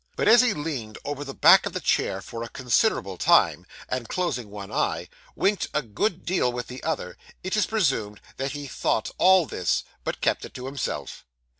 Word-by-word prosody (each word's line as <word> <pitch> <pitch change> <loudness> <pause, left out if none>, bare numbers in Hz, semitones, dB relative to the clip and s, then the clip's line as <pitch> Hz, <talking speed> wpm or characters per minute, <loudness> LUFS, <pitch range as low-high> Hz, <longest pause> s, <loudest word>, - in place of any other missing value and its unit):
But - - 0
as 230 +3 +8
he 245 -4 +2
leaned 135 -9 -4
over 145 0 -4
the 135 -1 -8
back - - +7
of - - -6
the - - -2
chair 95 0 0
for 115 +4 -7
a 115 - -5
considerable 125 - 0
time, - - +4 0.2
and 125 -3 -3
closing 150 - -2
one 100 0 -8
eye, - - -1 0.3
winked 200 -2 +1
a 150 - +1
good 170 - -2
deal 170 -8 +1
with 120 0 -4
the 125 +1 -8
other, 135 - -3 0.3
it 185 +2 -1
is 210 - +2
presumed 130 - 0 0.2
that 135 +1 -2
he 145 -1 -6
thought 120 -4 -1
all 185 -1 +6
this, 90 - -1 0.2
but - - -3
kept - - 0
it - - -10
to 125 - -6
himself. 135 -1 -4
135 Hz, 195 wpm, -25 LUFS, 115-180 Hz, 0.3 s, as